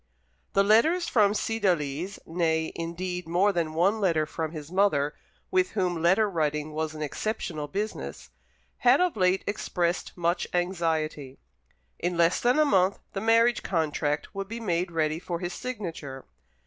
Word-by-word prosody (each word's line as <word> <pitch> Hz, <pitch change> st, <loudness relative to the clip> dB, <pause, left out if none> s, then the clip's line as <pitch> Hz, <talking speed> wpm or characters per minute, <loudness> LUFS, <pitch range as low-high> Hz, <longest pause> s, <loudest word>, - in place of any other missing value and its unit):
The 195 Hz, -, +4 dB
letters 315 Hz, -, +4 dB
from 210 Hz, -3 st, +3 dB
Cydalise 185 Hz, -5 st, -1 dB
nay, 160 Hz, -1 st, 0 dB
indeed, 180 Hz, +1 st, -4 dB
more 185 Hz, +5 st, +3 dB
than 165 Hz, -3 st, -1 dB
one 195 Hz, +6 st, +2 dB
letter 165 Hz, -6 st, +2 dB
from 160 Hz, 0 st, -4 dB
his 155 Hz, -1 st, -8 dB
mother, 170 Hz, -7 st, +2 dB, 0.4 s
with 370 Hz, 0 st, +2 dB
whom 180 Hz, -4 st, 0 dB
letter 190 Hz, +6 st, +4 dB
writing 155 Hz, -4 st, -1 dB
was 155 Hz, 0 st, -3 dB
an 155 Hz, -, -4 dB
exceptional 155 Hz, -2 st, -3 dB
business 205 Hz, +7 st, -5 dB, 0.5 s
had 250 Hz, +2 st, +5 dB
of 360 Hz, -1 st, +2 dB
late 185 Hz, -1 st, +2 dB
expressed 175 Hz, -4 st, -2 dB
much 170 Hz, 0 st, 0 dB
anxiety. 160 Hz, -6 st, -1 dB, 0.6 s
In 175 Hz, 0 st, -1 dB
less 170 Hz, +1 st, +3 dB
than 245 Hz, +4 st, +2 dB
a 305 Hz, -, +5 dB
month 190 Hz, -6 st, +3 dB, 0.2 s
the 195 Hz, -, -3 dB
marriage 230 Hz, +2 st, +4 dB
contract 150 Hz, -3 st, -1 dB
would 195 Hz, 0 st, -4 dB
be 230 Hz, +3 st, -6 dB
made 180 Hz, -5 st, -1 dB
ready 160 Hz, -1 st, 0 dB
for 175 Hz, -1 st, -4 dB
his 175 Hz, 0 st, -4 dB
signature. 170 Hz, -, -6 dB
175 Hz, 150 wpm, -27 LUFS, 160-205 Hz, 0.6 s, had